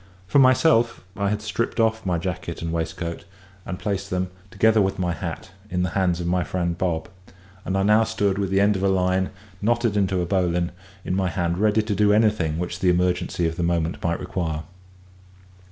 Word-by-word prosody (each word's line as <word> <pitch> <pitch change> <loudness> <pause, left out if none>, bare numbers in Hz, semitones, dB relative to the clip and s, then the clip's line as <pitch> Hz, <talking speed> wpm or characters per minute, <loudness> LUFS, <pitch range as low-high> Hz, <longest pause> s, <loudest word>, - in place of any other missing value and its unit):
For 90 +10 +3
myself, 130 -2 +4
I 100 -1 0
had 105 +1 -2
stripped 110 +3 -2
off 110 -2 +1
my 90 -2 +1
jacket 85 -1 -4
and 85 - -2
waistcoat, 85 0 -3 0.4
and 90 - -4
placed 100 -1 -3
them, 90 0 -2 0.2
together 110 +2 +3
with 95 0 0
my 90 -2 0
hat, 85 +2 -6 0.2
in 90 -2 0
the 90 - -1
hands 90 -2 +1
of 85 - -3
my 90 +1 +1
friend 85 -2 -2
Bob; 85 -2 -1 0.6
and 95 - -1
I 95 - +2
now 105 +2 +5
stood 100 -3 0
with 100 -2 -1
the 95 0 +2
end 105 +1 +4
of 95 - -2
a 100 - +2
line, 95 0 +1 0.3
knotted 120 0 +1
into 95 -2 +1
a - - -1
bowline, 90 -2 0 0.3
in - - -1
my 95 -1 +1
hand, 85 0 -1
ready 105 +1 +3
to 110 -1 -2
do 105 +1 +3
anything 105 -8 +2
which 90 +1 -3
the 90 - +3
emergency 90 -1 +1
of 80 0 -4
the - - -1
moment 85 0 -1
might 85 0 0
require. 85 -4 -3
95 Hz, 200 wpm, -23 LUFS, 85-105 Hz, 0.6 s, now